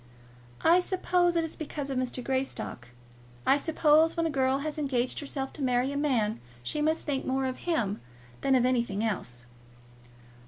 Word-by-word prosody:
"I 340 +2 +6
suppose 360 -1 +1
it 335 - +2
is 325 - -4
because 290 -2 -5
of 265 - -2
Mr. 250 0 -3
Greystock. 260 - -3 0.6
I - - +6
suppose 315 +2 +3
when 335 - +1
a 325 - 0
girl 265 -1 +2
has 305 +2 -4
engaged 255 -4 0
herself 275 -2 -4
to - - -8
marry 250 0 +1
a - - -4
man 240 -7 +1 0.2
she 300 - -2
must 315 +2 +1
think 280 -3 -1
more 265 0 0
of 260 +6 -4
him 215 - 0 0.4
than 270 -1 +3
of 250 -1 +4
anything 235 -5 +1
else." 125 - -3
270 Hz, 170 wpm, -29 LUFS, 250-310 Hz, 0.6 s, I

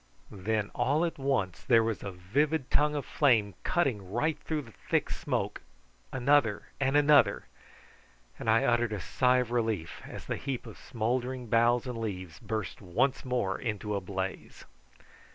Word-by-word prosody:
Then 105 +1 -2
all 150 +6 +2
at 165 - -4
once 130 -10 0
there 115 -3 +4
was 110 -1 -2
a 100 - -5
vivid 130 - 0
tongue 150 0 +3
of 145 - -2
flame 115 -9 +3
cutting 115 - 0
right 150 +8 +1
through 155 -2 -3
the 115 - -14 0.2
thick - - +1
smoke, - - -2 0.5
another 130 -4 +2
and 135 +1 +2
another, 145 -8 +5 0.9
and 115 - -2
I 115 +1 +4
uttered 120 -2 +2
a 105 - -3
sigh 125 +7 +2
of 125 -2 -1
relief 110 -8 -1
as - - -8
the - - -2
heap 135 -3 -4
of - - -10
smouldering 125 +2 -2
boughs 120 +2 +3
and 125 -3 -4
leaves 95 -7 -5
burst 110 -3 -4
once 100 +9 0
more 125 -7 -1
into 105 -2 -3
a 100 - -1
blaze. 95 0 -5
115 Hz, 160 wpm, -30 LUFS, 105-135 Hz, 0.9 s, another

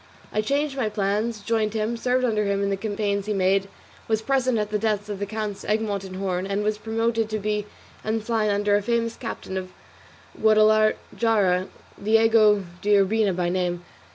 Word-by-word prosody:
I 215 - +2
changed 280 +5 -1
my 245 -6 0
plans, 210 +2 -1
joined 220 0 0
him, 220 +2 -1
served 250 +2 +1
under 215 -3 +1
him 200 0 0
in 200 - 0
the - - +1
campaigns 200 0 -2
he 215 - 0
made, 195 0 +1 0.4
was 220 0 0
present 255 -2 +1
at 210 -1 -2
the 210 - 0
deaths 210 -1 -1
of 205 -2 -4
the 200 - -3
Counts 215 -1 -4
Egmont 210 -2 -1
and 190 -1 -8
Horn, 185 -1 -2
and 200 +1 -1
was 210 0 -1
promoted 225 0 -1
to 215 - -1
be 210 0 -2 0.4
ensign 220 0 0
under 205 0 +2
a 205 - +2
famous 230 +1 -1
captain 225 -5 -6
of 185 -1 -5 0.6
Guadalajara, 215 -3 +3 0.4
Diego 220 -1 +4 0.2
de 205 0 +3
Urbina 200 +1 +2
by 175 -1 0
name. 175 -1 -1
215 Hz, 180 wpm, -24 LUFS, 200-225 Hz, 0.6 s, Diego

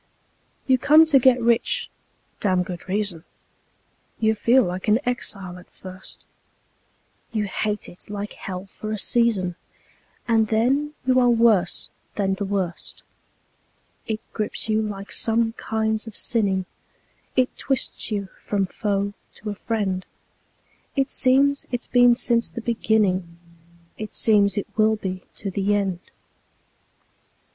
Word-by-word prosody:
You 260 -1 +3
come 310 +5 +7
to 295 -4 +5
get 255 0 +5
rich 235 0 +1 0.5
(damned 185 -3 +1
good 180 0 -7
reason); 195 -4 -1 1.0
You 220 -1 +3
feel 235 +4 +4
like 180 +1 -4
an 210 +1 +5
exile 195 -7 -3
at 180 - -17
first; 185 0 -10 1.1
You 215 -2 0
hate 210 +1 -2
it 175 - -14
like 205 0 -5
hell 185 0 -6
for 215 +2 -8
a 215 - -2
season, 200 -5 +1 0.7
And 225 -2 +3
then 270 +8 +1
you 255 0 +4
are 245 -1 +4
worse 225 -6 +3 0.3
than 195 -2 +1
the 200 +1 -3
worst. 190 -3 -3 1.0
It 220 -1 -2
grips 215 0 -1
you 220 0 +2
like 200 -2 -5
some 225 0 +1
kinds 220 0 -1
of 220 - -5
sinning; 195 -5 +2 0.7
It 255 -1 +2
twists 270 -3 0
you 200 -3 -3
from 200 -2 -1
foe 200 +1 -2 0.2
to 215 - -5
a - - -3
friend; 200 -4 -2 0.9
It 270 0 +1
seems 275 +2 +3
it's 245 -1 -2
been 245 -1 +5
since 235 -1 +1
the 235 - -7
beginning; 200 -7 0 0.6
It 215 0 -6
seems 205 -3 +4
it 205 - -1
will 220 0 +4
be 185 -3 -5
to 200 - -4
the 200 +2 +1
end. 195 -4 -1
215 Hz, 135 wpm, -23 LUFS, 195-235 Hz, 1.1 s, come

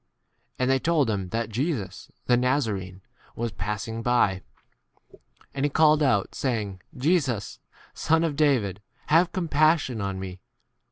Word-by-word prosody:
37 - - -1
And 130 - +2
they 135 - +3
told 155 -4 +1
him 95 -3 -3
that 115 +1 -2
Jesus 115 - -3 0.2
the 125 - +2
38 125 +1 +1
Nazaraean 100 -9 -2 0.3
was 115 0 -3
passing 105 +3 -4
by. 115 -6 +2 1.1
And 135 - -3
he 145 - +2
called 155 +1 +4
out, 105 -9 +1
saying, 105 -8 -3 0.2
Jesus, 130 - 0 0.3
Son 160 +1 +1
of 160 -3 -1
David, 125 - +1 0.3
have 165 +3 +4
compassion 155 - +1
on 100 -1 -3
me. 95 -1 -7
125 Hz, 145 wpm, -25 LUFS, 100-150 Hz, 1.1 s, called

